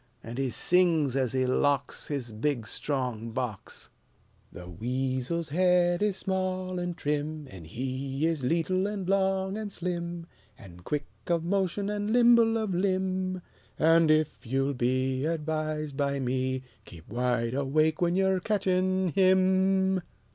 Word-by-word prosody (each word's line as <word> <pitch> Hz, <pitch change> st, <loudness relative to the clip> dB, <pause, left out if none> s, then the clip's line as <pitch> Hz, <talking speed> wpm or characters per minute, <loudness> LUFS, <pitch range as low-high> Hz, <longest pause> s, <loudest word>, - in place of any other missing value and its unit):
And 120 Hz, +3 st, -6 dB
he 135 Hz, -1 st, 0 dB
sings 165 Hz, -3 st, +2 dB
as 130 Hz, -4 st, 0 dB
he 130 Hz, 0 st, +1 dB
locks 140 Hz, +2 st, 0 dB
His 135 Hz, -6 st, -4 dB
big 120 Hz, +2 st, -1 dB
strong 125 Hz, -3 st, -3 dB
box: 115 Hz, -4 st, -5 dB, 0.6 s
SONG -, -, -10 dB
"The 90 Hz, -, -9 dB
weasel's 130 Hz, -, -2 dB
head 175 Hz, +2 st, +3 dB
is 205 Hz, -2 st, +1 dB
small 185 Hz, -1 st, -2 dB
an' 175 Hz, -1 st, -3 dB
trim, 150 Hz, -1 st, -3 dB
An' 90 Hz, -4 st, -10 dB
he 130 Hz, -, -3 dB
is 165 Hz, -3 st, 0 dB
leetle 170 Hz, +7 st, +1 dB
an' 205 Hz, -2 st, -4 dB
long 190 Hz, +1 st, +1 dB
an' 215 Hz, -1 st, -4 dB
slim, 175 Hz, -2 st, -4 dB, 0.3 s
An' 95 Hz, -7 st, -13 dB
quick 145 Hz, +10 st, -3 dB, 0.2 s
of 170 Hz, -2 st, +1 dB
motion 195 Hz, +2 st, 0 dB
an' 205 Hz, 0 st, -2 dB
nimble 235 Hz, 0 st, +5 dB
of 215 Hz, -4 st, -2 dB
limb, 185 Hz, 0 st, -1 dB, 0.3 s
An' 165 Hz, 0 st, +4 dB
ef 155 Hz, -1 st, +2 dB
yeou'll 135 Hz, +3 st, 0 dB
be 130 Hz, +2 st, 0 dB
Advised 155 Hz, -2 st, -2 dB
by 140 Hz, -1 st, 0 dB
me, 130 Hz, 0 st, -1 dB, 0.2 s
Keep 80 Hz, -2 st, -13 dB
wide 120 Hz, 0 st, 0 dB
awake 150 Hz, +4 st, +1 dB
when 175 Hz, 0 st, +2 dB
ye're 190 Hz, 0 st, +2 dB
ketchin' 185 Hz, -2 st, +1 dB
him!" 190 Hz, +1 st, +3 dB
160 Hz, 140 wpm, -28 LUFS, 130-185 Hz, 0.6 s, nimble